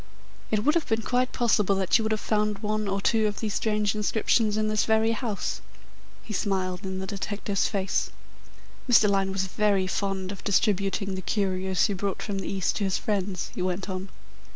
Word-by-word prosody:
It 210 -1 +1
would 300 - +5
have 335 -2 0
been 225 0 0
quite 250 +2 +1
possible 210 -5 +2
that 190 -1 +1
you - - -1
would 220 - -1
have 215 - +1
found 210 -1 0
one 215 0 -1
or 195 0 -1
two 220 +1 +3
of 210 - -3
these 215 -3 -2
strange 210 -2 +1
inscriptions 215 0 +1
in 215 0 +1
this 215 -1 +2
very 220 0 +3
house." 225 -3 -3 0.6
He 215 - -7
smiled 190 -2 -1
in 190 -1 -4
the 190 - -3
detective's 200 0 -1
face. 195 -2 -1 0.8
"Mr. 220 -3 +6
Lyne 195 -1 +1
was 190 0 -1
very 200 0 +1
fond 190 0 -2
of 195 - -9
distributing 200 -1 +1
the 185 - -4
curios 190 0 0
he 205 - 0
brought 195 +1 -3
from 200 -2 -3
the - - -5
East 190 -2 0
to 205 - -1
his 190 -2 +1
friends," 195 -3 -2
he - - -4
went 185 +2 -2
on. 190 +1 -4
200 Hz, 200 wpm, -27 LUFS, 190-215 Hz, 0.8 s, Mr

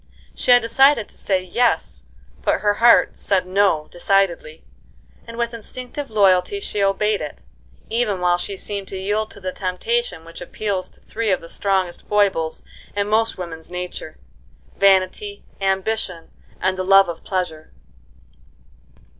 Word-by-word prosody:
She - - -5
had 245 -1 +7
decided 265 0 +4
to - - -14
say 190 -2 -1
"yes," 175 - 0 0.4
but - - +1
her 205 -1 +3
heart 235 +3 +4
said 190 -2 +1
"no" 185 -5 +2
decidedly, 175 -4 0 0.6
and 230 0 -9
with 235 0 -1
instinctive 255 +5 -5
loyalty 200 - +3
she 210 - -3
obeyed 200 +1 +1
it, 150 - -6 0.5
even 220 -4 0
while 175 0 +2
she 195 +2 -4
seemed 200 0 -4
to 190 - -6
yield 210 +3 -1
to - - -14
the 185 -1 -4
temptation 185 -1 -2
which 165 +1 -11
appeals 190 +1 -3
to - - -19
three 225 -1 -3
of 185 - +2
the 165 - -11
strongest 190 -3 -1
foibles 195 -6 +1 0.3
in 205 0 0
most 225 +1 +1
women's 165 -3 -7
nature,—vanity, 180 - -2 0.2
ambition, 190 -2 -1 0.3
and 185 0 0
the - - 0
love 195 +1 +6
of 170 -1 -6
pleasure. 180 -5 -3
195 Hz, 145 wpm, -21 LUFS, 180-215 Hz, 0.6 s, had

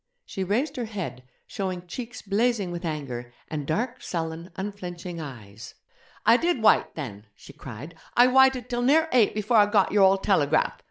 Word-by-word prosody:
She 190 - -4
raised 255 - -1
her 245 - -2
head, 195 - -6 0.2
showing 185 -2 -4
cheeks 235 +7 -7
blazing 210 -1 0
with 175 +1 -5
anger, 130 -6 -5 0.2
and 150 -3 -4
dark, 240 +10 -2
sullen, 165 0 -4
unflinching 180 -3 -6
eyes. 115 -7 -10 0.5
'I 235 - +7
did 330 -6 0
wyte 215 - +4
then!' 110 -9 -7
she - - -14
cried 135 +6 -9 0.2
'I 245 - +8
wyted 265 -1 +4
till 240 -1 -2
near 315 +6 +3
eight 230 -5 +4
before 215 +2 +1
I 205 -1 +6
got 205 -2 +2
your 205 0 +3
old 195 0 +4
telegraph! 155 -6 +2
195 Hz, 170 wpm, -26 LUFS, 160-240 Hz, 0.5 s, I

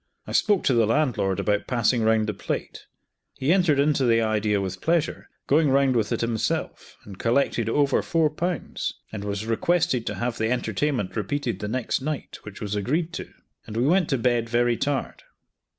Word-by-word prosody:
I - - -8
spoke 205 -4 +2
to 130 - +3
the 115 -3 +3
landlord 115 -8 +1
about 105 +1 0
passing 120 -1 +2
round 110 0 +3
the 105 - -2
plate. - - -5 0.5
He 140 +6 +2
entered 175 -6 +3
into 140 -1 +2
the 115 -2 +4
idea 110 -2 +1
with 95 -1 -4
pleasure, 165 -1 0 0.2
going 150 +1 +3
round 135 -1 +3
with 110 -3 0
it - - 0
himself, 115 -2 -2
and 100 -2 -11
collected 115 -2 +1
over 140 +2 +2
four 160 -3 +1
pounds, 175 +1 -3 0.2
and 105 -2 -5
was 100 +1 -3
requested 130 +2 +1
to - - -2
have 120 0 -3
the 110 0 +1
entertainment 125 -2 -1
repeated 115 0 -2
the 105 - -4
next 125 +3 -1
night, 150 +1 -4
which 105 -1 -10
was 105 -1 -3
agreed 155 - -1
to; - - -6 0.4
and 110 0 -6
we 120 - +2
went 175 +3 +3
to 135 - +2
bed 120 -1 +1
very 120 0 +2
tired. 140 +2 -2
120 Hz, 185 wpm, -25 LUFS, 110-145 Hz, 0.5 s, the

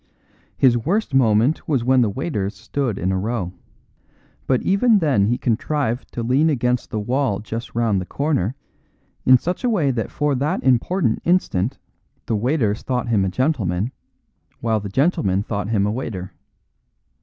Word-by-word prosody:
"His 120 -3 +4
worst 185 - -1
moment 120 +2 +3
was 135 -6 +1
when 130 +1 +4
the 115 - +2
waiters 105 - -3
stood 130 -8 -3
in 95 - -1
a 95 - 0
row; 100 -3 -3 0.9
but 130 -2 +1
even 215 +3 +4
then 140 - +2
he 120 +2 +1
contrived 125 +1 -1
to 120 - -3
lean 135 +7 +3
against 125 -3 0
the 110 - -3
wall 120 -2 0
just 115 +3 -6
round 110 -5 +1
the 90 - -7
corner 140 - -1 0.7
in 130 0 +8
such 180 - -4
a 250 - +2
way 165 - +2
that 115 -3 -2
for 150 -1 0
that 140 +3 -1
important 130 - +1
instant 130 - +1 0.5
the 115 - -1
waiters 115 -2 0
thought 125 -2 -2
him 105 -4 +2
a 95 - 0
gentleman, 110 - 0 0.7
while 115 -2 0
the 100 -1 -6
gentlemen 100 - +1
thought 105 -2 -3
him 105 -3 +2
a 105 - 0
waiter. 105 -6 -5
120 Hz, 165 wpm, -21 LUFS, 105-140 Hz, 0.9 s, in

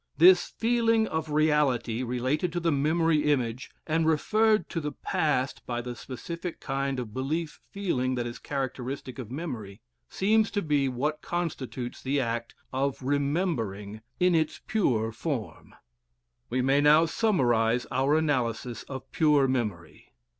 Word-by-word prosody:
This 180 +2 +7
feeling 230 -1 +3
of 160 -1 -3
reality, 150 -6 +2
related 130 +7 -1
to 175 - 0
the 165 -1 +1
memory 155 +2 +2
image, 125 -2 -1 0.2
and 160 0 +1
referred 215 +7 +3
to 165 - -3
the 150 -1 -4
past 135 -4 -1
by 120 -1 -2
the 120 0 -5
specific 165 +9 -6
kind 135 -1 -2
of 115 -4 -6
belief 150 +5 -3
feeling 130 -11 -1
that 120 -1 -2
is 120 0 -6
characteristic 135 -1 -4
of 120 -5 -6
memory, 120 - -6 0.3
seems 215 +2 +2
to 205 - -2
be 145 -3 +2
what 145 +5 -2
constitutes 130 -8 -4
the 140 +2 0
act 115 -2 -2 0.2
of 135 0 -1
remembering 135 - -1 0.2
in 180 0 +4
its 160 -2 +1
pure 115 - +1
form. 120 -1 -5 0.7
We 125 +1 0
may 135 +2 +3
now 150 +3 +6
summarize 125 - +2
our 135 +4 +2
analysis 125 -6 -1
of 130 -1 -7
pure 150 -4 +4
memory. 105 -11 -3
140 Hz, 140 wpm, -28 LUFS, 125-160 Hz, 0.7 s, This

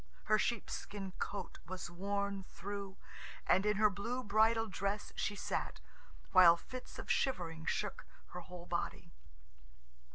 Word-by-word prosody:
Her 215 0 +4
sheepskin 205 -3 -2
coat 205 - -4
was 185 0 -5
worn 200 +2 -1
through, 200 +1 -6 0.5
and 190 +3 +4
in 210 -1 +3
her 215 0 +5
blue 235 +6 -3
bridal 220 +2 +4
dress 200 +1 -2
she 205 - -1
sat, - - -2 0.5
while 175 -3 +9
fits 255 +8 -8
of - - -2
shivering 165 -11 0
shook 210 - -1 0.2
her 180 - -6
whole 180 0 -9
body. - - -3
200 Hz, 130 wpm, -36 LUFS, 185-210 Hz, 0.5 s, while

